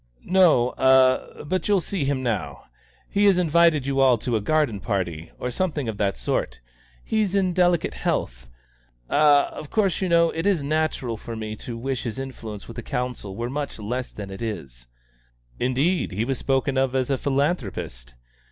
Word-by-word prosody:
"No, 170 -10 +4
ah 130 0 +4
but 185 +2 -1
you'll 205 -2 +4
see 180 -3 -3
him 135 -1 -1
now. 90 - -3 0.4
He 205 +1 +1
has 195 -3 +5
invited 165 -4 +3
you 135 0 0
all 130 -3 +5
to 115 +1 -2
a 110 - +1
garden 145 -4 +1
party, 90 -6 -3
or 125 - -3
something 150 -3 -2
of 110 -2 -3
that 100 -1 0
sort. - - -2 0.4
He's 210 -3 0
in 185 -2 +2
delicate 175 -2 +2
health. - - -2 0.6
Ah 145 -1 +5
of 150 - -9
course, 200 -5 +1
you 190 - 0
know, 170 -1 +4
it 165 +4 -2
is 185 -8 +2
natural 145 -6 -1
for 115 +2 -7
me 110 -1 -5
to 115 +1 -7
wish 130 +1 -3
his 115 -1 -4
influence 115 -6 -7
with 115 - -10
the - - -3
Council 125 -5 -4
were 120 +3 -3
much 140 +2 -4
less 120 +4 -4
than 100 -2 -8
it 95 - -8
is." 65 - -6 0.7
"Indeed! 135 +9 +1
He 105 +5 -1
was 135 -1 -2
spoken 135 0 +1
of 135 0 0
as 130 +1 0
a 135 - +2
philanthropist." 135 - -2
130 Hz, 180 wpm, -24 LUFS, 110-155 Hz, 0.7 s, has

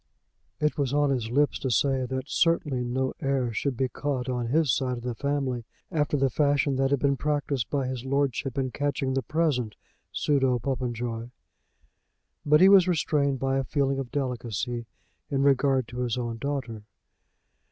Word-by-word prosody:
It 150 0 0
was 140 -1 0
on 145 -1 +3
his 120 -4 -1
lips 145 +4 +2
to 130 - -2
say 130 0 +1
that 130 +1 -3
certainly 150 -8 +1
no 130 +2 -1
heir 135 -4 0
should 130 +3 -1
be 130 - +1
caught 135 -1 -3
on 125 -2 -2
his 145 0 +2
side 125 -2 -1
of 120 - -9
the 125 -1 -2
family 135 -2 -2 0.3
after 150 -3 +1
the 135 -1 +2
fashion 145 0 +2
that 135 0 +2
had 140 -1 +2
been 140 0 +1
practised 145 -4 -1
by 140 -2 0
his 125 -1 -4
lordship 135 -1 -1
in 130 -2 -1
catching 140 -2 -1
the 135 - +1
present 140 -9 0 0.4
pseudo 135 -4 +2
Popenjoy; 120 -2 -3 1.1
but 150 +2 +4
he 190 - +9
was 195 -2 +7
restrained 145 -5 +1
by 135 +1 0
a - - 0
feeling 135 -1 0
of 135 -3 -4
delicacy 120 -3 -3 0.4
in 140 -1 +1
regard 135 -2 +3
to 125 - -7
his 125 -1 -1
own 120 -2 -3
daughter. 130 -5 -3
135 Hz, 175 wpm, -27 LUFS, 125-145 Hz, 1.1 s, he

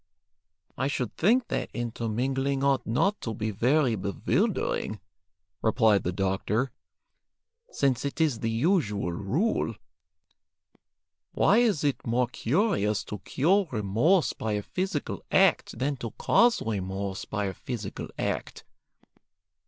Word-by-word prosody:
"I 135 - +1
should 125 -5 -3
think 235 +8 +3
that - - -2
intermingling 125 +4 -1
ought 140 -1 +2
not 195 - +1
to 115 -2 -4
be 110 +1 -2
very 125 +4 +2
bewildering," 100 -2 -1 0.6
replied 110 -3 +3
the 90 - -2
doctor, 95 +6 -1 1.0
"since 130 - 0
it 140 +3 -4
is 150 -8 +2
the 115 - -1
usual 115 - +1
rule. 115 - 0 1.6
Why 210 - +4
is 215 -11 +2
it 145 -2 0
more 120 +2 +2
curious 125 - +1
to 105 - -7
cure 175 - +2
remorse 115 - +2
by 110 -1 -3
a 105 0 -1
physical 185 - -3
act - - +3
than 140 +1 -1
to 120 -2 -5
cause 235 0 +3
remorse 95 -2 -3
by 105 -1 -2
a 95 - -2
physical 110 -4 -6
act? - - -3
120 Hz, 120 wpm, -27 LUFS, 105-145 Hz, 1.6 s, Why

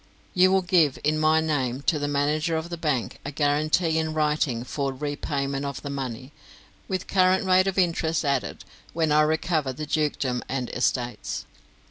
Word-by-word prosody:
You 185 +1 +5
will 190 0 +3
give, 170 -6 +3
in 155 +1 +1
my 155 +1 +4
name, 135 -4 -1
to 150 - +1
the 145 - -1
manager 150 +3 0
of 160 +2 -5
the - - -2
bank, 150 -7 -2
a 140 - -5
guarantee 155 +3 +1
in 160 -1 -2
writing 150 -6 0
for 135 +2 -2
repayment 140 0 -3
of 140 -1 -5
the 140 - -4
money, 130 -1 -5 0.6
with 185 -2 -3
current 185 +1 +3
rate 185 0 +4
of 195 - -1
interest 165 -3 +1
added, 140 -2 -1 0.3
when 160 -2 +1
I 150 +1 +5
recover 155 -2 0
the 155 +4 -5
dukedom 145 -5 -1
and 130 -2 -3
estates. 125 -1 -2
150 Hz, 170 wpm, -25 LUFS, 140-160 Hz, 0.6 s, You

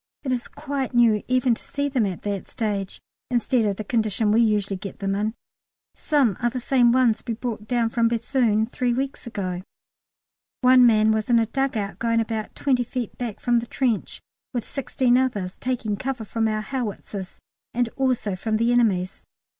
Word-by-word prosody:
It 265 - -2
is 245 -1 -1
quite 280 -3 -4
new 230 -3 +5
even 255 -1 +3
to - - -6
see 285 0 -2
them 255 -7 +1
at 185 -3 -6
that 200 -2 -3
stage, 205 -4 -3 0.3
instead 245 -1 +2
of 200 - 0
the 215 - -4
condition 215 -1 +1
we 225 +2 +4
usually 210 -3 +1
get 195 +1 -7
them 195 -1 -1
in. 210 +3 -1 0.6
Some 270 - +1
are 240 - +2
the 250 +1 -4
same 245 -1 +3
ones 245 -3 +3
we 230 - -1
brought 220 -2 -5
down 235 -1 +1
from 230 -1 +2
Béthune 230 -2 +1
three 245 0 -1
weeks 270 -1 -3
ago. 185 -5 -3 1.0
One 255 -1 +7
man 215 -1 +4
was 220 0 -1
in 240 - +5
a 230 - +3
dug 270 +2 -1
out 200 -2 -4
going 230 0 +2
about 220 -1 -3
twenty 255 -3 +1
feet 245 -1 -4
back 235 -4 -4
from 240 -1 +2
the 235 - -6
trench, 240 -7 -1 0.4
with 235 - -2
sixteen 255 -2 +1
others, 205 -8 -1
taking 240 -5 -1
cover 255 -1 -3
from 225 +1 0
our 215 0 -1
howitzers 210 -6 -5 0.3
and 245 0 +1
also 250 -6 0
from 215 +4 -1
the 230 +2 +2
enemy's. 200 -7 +1
230 Hz, 185 wpm, -24 LUFS, 215-250 Hz, 1.0 s, One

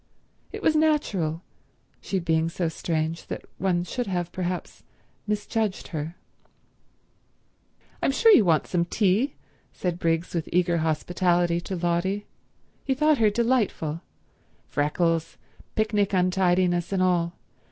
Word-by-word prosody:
It - - -7
was 315 - +3
natural, 205 - +1 0.6
she 195 - -2
being 165 -2 +1
so 170 0 -1
strange, 160 0 -2
that - - -6
one 180 -2 +1
should 245 +6 -3
have, 175 -2 -2
perhaps, 180 -1 -4 0.5
misjudged 210 -1 -2
her... 160 +1 -4 1.9
"I'm - - +2
sure 450 +11 +5
you 260 - +7
want 165 -4 +3
some 175 -2 0
tea," 205 - +1 0.4
said 175 -2 -3
Briggs 165 0 0
with 170 -3 -2
eager 175 -1 +2
hospitality 175 +2 +1
to 190 - -5
Lotty. 175 +4 -1 0.6
He 265 - 0
thought 300 0 +3
her 220 -2 +5
delightful,—freckles, 165 - -2 0.4
picnic 210 -2 +1
untidiness 180 -1 +2
and 190 -2 +1
all. 175 -2 +1
180 Hz, 120 wpm, -25 LUFS, 170-205 Hz, 1.9 s, you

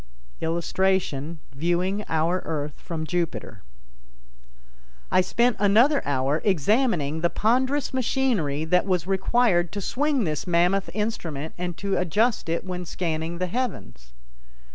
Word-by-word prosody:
[Illustration: 170 -2 0 0.2
Viewing 175 +7 0
Our 165 +3 +1
Earth 150 -2 -4
from 160 -3 -4
Jupiter.] 175 0 -3 1.5
I 185 - +5
spent 235 +6 +1
another 230 +9 +4
hour 140 +2 +1
examining 185 - +1
the 170 - +2
ponderous 260 +9 +1
machinery 220 - 0
that 180 +4 +2
was 180 -3 +1
required 190 -2 +2
to 205 - -3
swing 280 +5 0
this 155 -3 -2
mammoth 180 +3 +2
instrument 165 -9 -3
and 175 -1 -4
to 200 -1 -1
adjust 205 +3 +1
it 165 +3 -1
when 180 -1 -4
scanning 165 -1 -3
the 185 - -1
heavens. 115 - -4
180 Hz, 120 wpm, -25 LUFS, 160-210 Hz, 1.5 s, I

